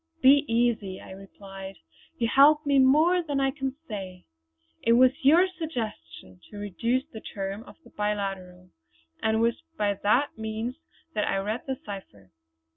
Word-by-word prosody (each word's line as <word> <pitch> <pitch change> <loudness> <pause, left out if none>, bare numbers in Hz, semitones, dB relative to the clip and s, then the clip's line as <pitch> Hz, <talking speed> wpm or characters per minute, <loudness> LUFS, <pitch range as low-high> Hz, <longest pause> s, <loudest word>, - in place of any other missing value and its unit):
"Be 280 +2 +6
easy," 230 -5 0
I - - -12
replied. 195 0 -10 0.4
"You 230 - 0
helped 295 +5 +5
me 280 -1 +3
more 310 +7 +5
than 290 -4 -2
I 270 0 +2
can 270 -1 -4
say. 190 -4 -7 0.6
It 230 - +3
was 250 +1 +6
your 325 +7 +6
suggestion 225 - -7
to 205 - -11
reduce 230 +6 -1
the 220 - -8
terms 195 +3 -6
of - - -13
the - - -18
biliteral; 195 -3 -4 0.5
and 220 0 +1
it - - +1
was 235 +5 +1 0.2
by 205 -1 +1
that 225 +7 +1
means 220 +3 -4 0.4
that 210 - 0
I - - 0
read 210 +6 -3
the 265 -1 -2
cipher. 105 - -10
220 Hz, 160 wpm, -27 LUFS, 195-270 Hz, 0.6 s, Be